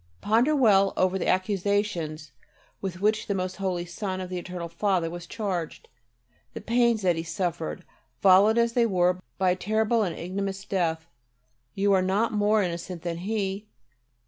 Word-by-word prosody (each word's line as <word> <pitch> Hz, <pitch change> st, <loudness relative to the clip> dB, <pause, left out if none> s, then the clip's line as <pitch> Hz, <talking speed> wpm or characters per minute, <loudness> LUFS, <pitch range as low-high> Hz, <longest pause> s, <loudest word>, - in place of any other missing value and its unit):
Ponder 235 Hz, -, +2 dB
well 200 Hz, -7 st, +4 dB
over 185 Hz, +1 st, +2 dB
the -, -, -2 dB
accusations 185 Hz, -5 st, -1 dB, 0.5 s
with 185 Hz, -1 st, -5 dB
which 215 Hz, +1 st, +1 dB
the 200 Hz, -, -1 dB
most 185 Hz, 0 st, -3 dB
holy 185 Hz, -3 st, -2 dB
Son 185 Hz, +2 st, -4 dB
of 185 Hz, -1 st, -6 dB
the 180 Hz, -, -2 dB
Eternal 175 Hz, -1 st, -6 dB
Father 170 Hz, -1 st, 0 dB
was 175 Hz, 0 st, -8 dB
charged, 185 Hz, -6 st, -4 dB, 0.7 s
the -, -, -4 dB
pains 235 Hz, -2 st, +2 dB
that 180 Hz, -2 st, +3 dB
He -, -, -1 dB
suffered, 170 Hz, -, -3 dB, 0.3 s
followed 200 Hz, +4 st, +6 dB
as 235 Hz, 0 st, +2 dB
they 235 Hz, -1 st, +3 dB
were 180 Hz, -2 st, +2 dB, 0.2 s
by 185 Hz, -1 st, +3 dB
a -, -, +1 dB
terrible 220 Hz, +4 st, +1 dB
and 180 Hz, -6 st, -2 dB
ignominious 195 Hz, +2 st, -4 dB
death. 165 Hz, -5 st, -1 dB, 0.7 s
You 200 Hz, 0 st, +2 dB
are 190 Hz, -, +4 dB
not 195 Hz, +5 st, +1 dB
more 210 Hz, 0 st, +3 dB
innocent 170 Hz, -1 st, -5 dB
than 170 Hz, -1 st, -3 dB
He. 200 Hz, +1 st, -3 dB
190 Hz, 165 wpm, -26 LUFS, 175-210 Hz, 0.7 s, followed